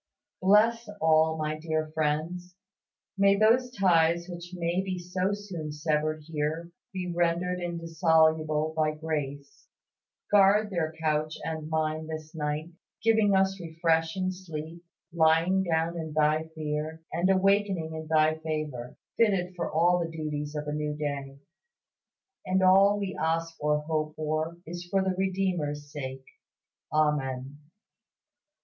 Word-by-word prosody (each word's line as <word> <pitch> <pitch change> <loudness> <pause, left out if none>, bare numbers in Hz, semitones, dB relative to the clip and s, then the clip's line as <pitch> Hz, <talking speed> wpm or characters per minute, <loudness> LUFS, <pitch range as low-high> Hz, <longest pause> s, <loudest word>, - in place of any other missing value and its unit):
Bless 215 +4 +4
all 160 0 +3
my 155 0 -2
dear 155 -1 -2
friends; 160 +4 -2 0.6
may 200 0 +5
those 230 +5 +4
ties 170 -6 +2
which 175 -1 -8
may 175 0 -1
be 190 -1 -3
so 180 +2 -1
soon 190 -7 -5
severed 155 0 -1
here 160 +2 -3 0.2
be 180 -2 -4
rendered 175 +1 +1
indissoluble 160 -2 +2
by 155 -1 +1
grace. 145 -3 -5 0.6
Guard 205 +1 +5
their 165 -4 -1
couch 155 -1 0
and 155 -1 -4
mine 155 0 -1
this 155 -1 -7
night; 150 +1 -3 0.3
give 225 0 +4 0.2
us 190 0 +2
refreshing 165 +2 0
sleep, 170 -2 -8 0.3
lying 165 +3 +3
down 165 -1 0
in 160 -2 -5
Thy 155 +1 +2
fear, 155 +1 -4
and 175 +3 +1
awaking 195 -3 +2
in 160 0 -6
Thy 155 0 +3
favor, 155 -6 -4 0.2
fitted 195 -5 +2
for 175 - -3
all 175 +3 +3
the 170 -1 -2
duties 150 -2 -4
of 150 0 -4
a 150 - -2
new 150 0 -2
day. 140 -2 -4 1.1
And 190 +1 +2
all 195 +2 +6
we 195 -2 -3
ask 165 +1 0
or 150 0 +1
hope 155 0 -2
for 155 +2 -2
is 175 +2 -6
for 195 0 +2
the 190 -1 0
Redeemer's 180 -7 -1
sake. 135 -2 -6 0.7
Amen. 145 -3 0
160 Hz, 130 wpm, -28 LUFS, 155-180 Hz, 1.1 s, all